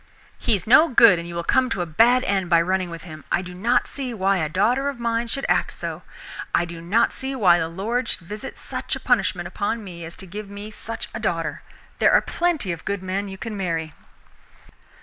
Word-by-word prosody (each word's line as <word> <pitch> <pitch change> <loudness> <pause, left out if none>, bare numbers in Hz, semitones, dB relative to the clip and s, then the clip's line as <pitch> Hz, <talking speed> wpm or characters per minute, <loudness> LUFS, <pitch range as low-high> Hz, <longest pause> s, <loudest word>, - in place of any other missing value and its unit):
"He 235 - +2
is 190 - -5
no 280 +8 +7
good, 230 -7 +7
and 170 - -6
you 170 - -7
will 170 - -2
come 260 +6 +2
to 180 - -1
a - - -4
bad 235 +10 +4
end 190 -3 0
by 170 -2 +6
running 185 +1 0
with 170 -1 -8
him! 155 -3 -10
I 185 - +1
do 180 -1 -8
not 225 +7 +1
see 255 -4 -5
why 195 -1 +2
a 155 -2 -1
daughter 235 - +2
of 275 -4 -7
mine 235 0 0
should 275 +4 -3
act - - +1
so. - - -5 0.5
I 175 - +3
do 170 -1 -8
not 210 +8 +2
see 270 0 -4
why 180 -8 +5
the 160 - -1
Lord 225 +9 -2
should - - -3
visit 210 +2 -7
such - - -4
a - - -6
punishment 190 -7 +1
upon 205 +5 -2
me 175 -4 -8
as 165 +2 -8
to 190 - -8
give 200 +3 -7
me 205 +1 -8
such 230 +1 -5
a 220 - -4
daughter. 170 -6 -2 0.4
There - - +5
are - - +8
plenty 335 - 0
of 170 - -6
good 200 -2 -3
men 190 +2 -2
you 190 -1 -8
can 225 +1 -5
marry." 165 -5 -2
195 Hz, 230 wpm, -23 LUFS, 175-230 Hz, 0.5 s, are